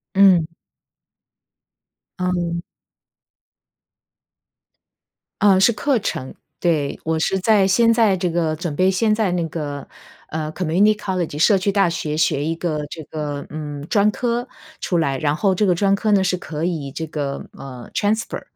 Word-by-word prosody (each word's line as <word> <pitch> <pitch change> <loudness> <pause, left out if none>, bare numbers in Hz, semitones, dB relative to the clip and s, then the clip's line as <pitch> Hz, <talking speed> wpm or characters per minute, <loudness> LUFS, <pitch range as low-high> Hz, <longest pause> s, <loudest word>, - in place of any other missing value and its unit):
嗯。 190 -4 +6 1.7
嗯。 175 -2 -1 2.8
呃， 195 -2 +5
是 215 - +5
课 255 +4 +1
程， 130 -10 -4 0.3
对。 155 -5 0
我 160 0 0
是 190 +4 0
在 200 0 +4
先 230 +4 +4
在 220 -5 +3
这 180 -1 -1
个 165 -2 0
准 155 -1 -4
备 185 +4 +3
先 215 +3 +2
在 215 -4 +1
那 175 -2 0
个， 145 -3 -5 0.4
呃， 155 0 -3
community 185 +5 +2
college 185 -7 -3
社 195 +5 +5
区 190 +2 0
大 195 -3 +3
学 155 -2 -3
学 145 -2 +1
一 165 +1 -1
个 155 -3 -2
这 160 - -7
个， 145 -1 -5
嗯， 145 -2 -6
专 210 -2 +4
科 240 +1 -2 0.3
出 180 - -1
来， 140 -5 0
然 145 +2 0
后 195 +4 +2
这 210 +3 +2
个 180 - +3
专 195 +2 +2
科 215 +2 0
呢 200 -2 +4
是 185 -1 0
可 155 -2 -6
以 160 -6 -2
这 160 +4 -4
个， 145 -3 -4
呃， 130 -3 -9
transfer， 215 +2 -1
175 Hz, 235 characters per minute, -21 LUFS, 155-200 Hz, 2.8 s, 嗯